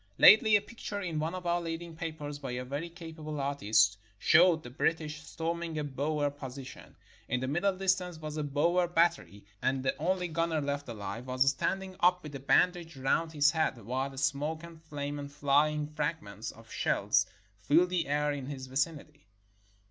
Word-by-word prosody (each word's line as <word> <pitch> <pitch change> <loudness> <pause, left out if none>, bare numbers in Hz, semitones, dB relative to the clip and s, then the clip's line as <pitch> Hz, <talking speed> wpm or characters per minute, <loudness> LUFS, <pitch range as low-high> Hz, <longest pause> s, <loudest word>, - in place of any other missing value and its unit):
Lately 215 0 +8
a 205 - +4
picture 210 -1 -6
in 170 -6 -3
one 160 +4 -2
of 180 -1 -7
our 175 0 +1
leading 165 0 -5
papers, 155 -3 -5
by 135 -3 -5
a 125 +1 -4
very 145 +6 -4
capable 160 -3 -7
artist, 110 -7 +2 0.2
showed 165 - +5
the 120 - -9
British 155 +2 -1
storming 165 +1 -4
a 150 - -1
Boer 145 +1 -1
position. 135 -2 -9 0.3
In 125 - +1
the 130 - -2
middle 185 +7 +1
distance 185 -2 0
was 155 -1 -6
a 155 - -1
Boer 165 +5 +2
battery, 135 - +1 0.2
and 130 0 0
the 130 - +1
only 180 +3 0
gunner 165 -1 0
left 140 -1 -3
alive 115 +2 -6
was 130 +1 +2
standing 190 +7 0
up 180 0 +4
with 150 -1 -8
a 140 - -5
band 180 +6 +4
age 165 -4 -10
round 160 +5 0
his 145 -1 +4
head, 155 -5 0
while 135 +3 -2
smoke 150 +3 -1
and 165 -1 -11
flame 145 -1 -4
and 140 0 -7
flying 150 +1 +2
fragments 150 - -4
of - - -14
shells - - +2 0.3
filled 165 - +4
the 175 -4 0
air 150 +1 +1
in 140 -2 -4
his 135 -2 -6
vicinity. 145 +1 -3
150 Hz, 180 wpm, -31 LUFS, 140-170 Hz, 0.3 s, Lately